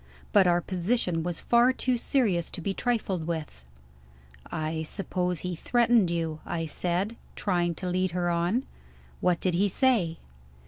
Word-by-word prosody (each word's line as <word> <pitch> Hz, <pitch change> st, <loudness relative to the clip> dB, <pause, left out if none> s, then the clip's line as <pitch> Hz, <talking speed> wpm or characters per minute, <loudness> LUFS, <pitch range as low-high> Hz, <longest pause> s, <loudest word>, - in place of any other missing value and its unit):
But 195 Hz, -3 st, +6 dB
our 175 Hz, 0 st, +3 dB
position 180 Hz, -1 st, 0 dB
was 175 Hz, 0 st, -3 dB
far 240 Hz, +2 st, +4 dB
too 255 Hz, -1 st, 0 dB
serious 225 Hz, -8 st, +1 dB
to -, -, -7 dB
be 195 Hz, +4 st, -1 dB
trifled 195 Hz, -8 st, -1 dB
with. 155 Hz, -, -4 dB, 0.9 s
"I 155 Hz, 0 st, -2 dB
suppose 180 Hz, 0 st, -2 dB
he 180 Hz, 0 st, -3 dB
threatened 235 Hz, 0 st, +3 dB
you?" 165 Hz, -2 st, -2 dB
I 165 Hz, -1 st, -3 dB
said, 180 Hz, +7 st, -1 dB, 0.2 s
trying 175 Hz, -4 st, 0 dB
to 185 Hz, -, -5 dB
lead 185 Hz, +1 st, +1 dB
her 175 Hz, 0 st, -1 dB
on. 175 Hz, +9 st, +1 dB, 0.6 s
"What 180 Hz, -1 st, +2 dB
did 185 Hz, -, 0 dB
he 200 Hz, +4 st, +2 dB
say?" 195 Hz, -8 st, +2 dB
180 Hz, 150 wpm, -28 LUFS, 170-210 Hz, 0.9 s, But